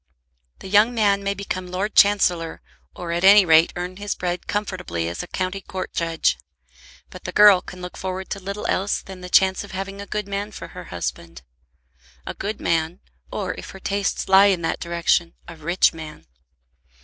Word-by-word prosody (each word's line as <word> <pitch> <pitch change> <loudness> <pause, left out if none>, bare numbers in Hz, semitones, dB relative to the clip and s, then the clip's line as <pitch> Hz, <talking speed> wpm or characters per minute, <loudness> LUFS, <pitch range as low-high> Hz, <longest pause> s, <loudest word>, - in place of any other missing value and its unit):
The - - -8
young 210 +5 +4
man 200 -3 +2
may 200 0 -2
become 185 -2 -5
Lord 195 +4 -2
Chancellor, 180 -5 +3 0.3
or 175 -1 -5
at 170 +1 -1
any 200 0 +8
rate 160 0 +5
earn 180 +1 -5
his 205 0 -3
bread 180 0 -4
comfortably 185 - -3
as 85 +1 -4
a - - -8
county 185 +1 -3
court 190 -1 -6
judge. 165 - 0 0.7
But - - -12
the - - -3
girl 205 -3 +7
can 180 -1 -10
look 180 - -7
forward 190 0 -5
to 200 - -3
little 200 +2 -6
else 195 +2 0
than 190 -1 -10
the 180 - -8
chance 190 +1 +4
of 205 - -11
having 195 +1 -5
a 200 - -9
good 210 -1 -3
man 200 +1 -4
for - - -8
her - - -10
husband; 85 -7 -6 0.8
a - - -5
good 205 +2 -5
man, 165 +1 0 0.3
or - - -3
if - - -9
her 190 - -10
tastes 200 +1 -2
lie 195 +1 +7
in 185 -4 +1
that 165 - -1
direction, 170 0 0
a 170 - -9
rich 170 +4 +2
man. 155 -2 -10
185 Hz, 190 wpm, -22 LUFS, 170-200 Hz, 0.8 s, any